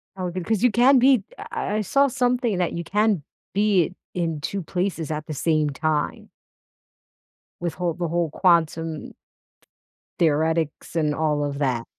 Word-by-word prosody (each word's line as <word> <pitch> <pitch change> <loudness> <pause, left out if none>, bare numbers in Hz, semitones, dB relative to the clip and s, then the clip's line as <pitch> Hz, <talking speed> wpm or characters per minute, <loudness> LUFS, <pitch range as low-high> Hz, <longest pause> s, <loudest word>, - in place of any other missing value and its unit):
Oh, 185 -2 -3
good, 185 -1 -5
'cause 220 -2 0
you 250 - +5
can 255 +3 +5
be 255 -5 +5
I 415 - -8 0.3
I - - 0
I - - +1
saw 275 +7 +3
something 245 -5 0
that 175 - 0
you 170 - -3
can 205 -3 +1 0.3
be 195 -4 +2 0.2
in 165 -4 -2
2 195 +5 -3
places 175 -2 -2
at 150 0 -3
the 155 - -4
same 155 0 +1
time 150 +1 -2 1.3
with 170 -2 -2
whole 175 -2 -1
The 175 0 -3
whole 170 -1 0
quantum 165 -2 +1 1.1
theoretics 160 0 0
and 150 -2 +1
all 150 -2 0
of 140 0 -4
that. 125 -4 0
170 Hz, 160 wpm, -24 LUFS, 155-205 Hz, 1.3 s, you